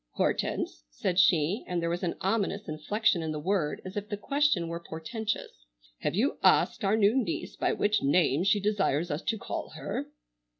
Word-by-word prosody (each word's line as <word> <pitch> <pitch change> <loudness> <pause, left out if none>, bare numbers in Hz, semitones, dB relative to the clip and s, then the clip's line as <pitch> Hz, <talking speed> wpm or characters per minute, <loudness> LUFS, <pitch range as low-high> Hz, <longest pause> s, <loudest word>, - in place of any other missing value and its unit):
"Hortense," - - -1
said 175 - -1
she, 180 +2 +3
and 175 -1 -1
there 170 - -1
was 175 - -2
an 175 -2 -1
ominous 200 0 0
inflection 170 +5 +1
in 160 -1 -2
the 155 - -3
word 170 -2 -1
as 185 +2 -7
if 205 0 -4
the 205 - -3
question 275 - +1
were 170 0 -4
portentous, 165 - -5 0.3
"have - - -1
you 245 +9 +1
asked - - +4
our 200 +2 +3
new 210 +2 +4
niece 260 -4 -2
by - - +1
what 210 +1 +1
name 155 +1 +3
she 200 +2 +3
desires 190 -6 0
us 145 +3 -2
to 225 - -1
call - - -5
her?" - - -4
190 Hz, 185 wpm, -29 LUFS, 160-210 Hz, 0.3 s, asked